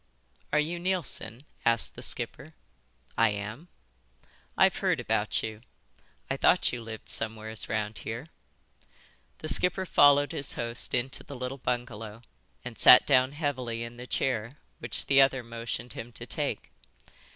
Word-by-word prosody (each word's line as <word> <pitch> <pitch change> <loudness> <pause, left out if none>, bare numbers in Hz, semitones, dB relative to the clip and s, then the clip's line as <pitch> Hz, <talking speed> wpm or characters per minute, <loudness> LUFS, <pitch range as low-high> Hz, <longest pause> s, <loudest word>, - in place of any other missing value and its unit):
"Are 150 - +2
you 165 +3 -1
Neilson?" 170 -8 -3 0.2
asked 115 -1 +2
the - - -10
skipper. - - -1 0.6
"I 115 -1 +5
am." 105 +10 -6 0.9
"I've - - +4
heard - - +1
about - - 0
you. 110 -1 -5 0.7
I - - -2
thought - - +3
you 120 - -4
lived 110 -1 -9
somewheres 110 0 -1
round 105 0 -2
here." 120 +8 -6 1.1
The 155 - -6
skipper 180 +4 +4
followed 145 -3 +5
his 140 - -2
host 120 +2 -2
into 125 +1 -2
the 140 - -9
little 125 +2 -5
bungalow 115 -3 -4 0.4
and 125 -2 -8
sat 125 - +9
down 130 -1 +3
heavily 130 -6 -3
in 115 +1 -9
the 125 +1 -9
chair 125 +1 -2 0.2
which - - -3
the 135 0 +5
other 135 -2 +3
motioned 115 +1 -5
him 115 +2 -8
to - - -5
take. - - -4
120 Hz, 145 wpm, -28 LUFS, 115-140 Hz, 1.1 s, sat